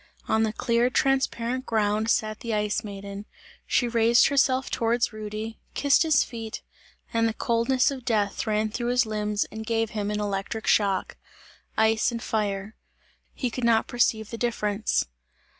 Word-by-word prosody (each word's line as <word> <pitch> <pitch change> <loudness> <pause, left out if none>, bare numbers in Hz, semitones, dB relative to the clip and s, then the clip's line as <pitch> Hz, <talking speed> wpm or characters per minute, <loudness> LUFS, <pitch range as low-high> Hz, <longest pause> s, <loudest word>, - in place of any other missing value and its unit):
On 220 - +2
the 220 -1 +1
clear 235 +2 +1
transparent 260 -1 0
ground 215 0 +1
sat 215 -1 0
the 230 -2 -2
Ice 210 +1 0
Maiden; 200 0 -7 0.4
she 245 - +2
raised 235 0 +4
herself 265 -2 +2
towards 235 0 +1
Rudy, 215 +1 -6 0.2
kissed 285 -1 +4
his 315 -4 +4
feet, 225 -2 -7 0.5
and 230 0 +3
the 220 - -5
coldness 240 +3 +2
of 265 -2 -6
death 215 -5 0
ran 215 0 0
through 240 +2 -2
his 245 0 +3
limbs 210 -1 -1
and 220 0 -6
gave 225 -1 -1
him 205 -1 -2
an 210 0 -1
electric 205 +2 -3
shock 195 -3 +1 0.6
ice 220 +1 +3
and 235 0 -5
fire. 205 -2 -2 0.6
He 250 -3 -2
could 250 - -5
not 230 -1 +3
perceive 220 -3 +1
the 230 - -6
difference. 215 -3 0
225 Hz, 160 wpm, -26 LUFS, 210-240 Hz, 0.6 s, raised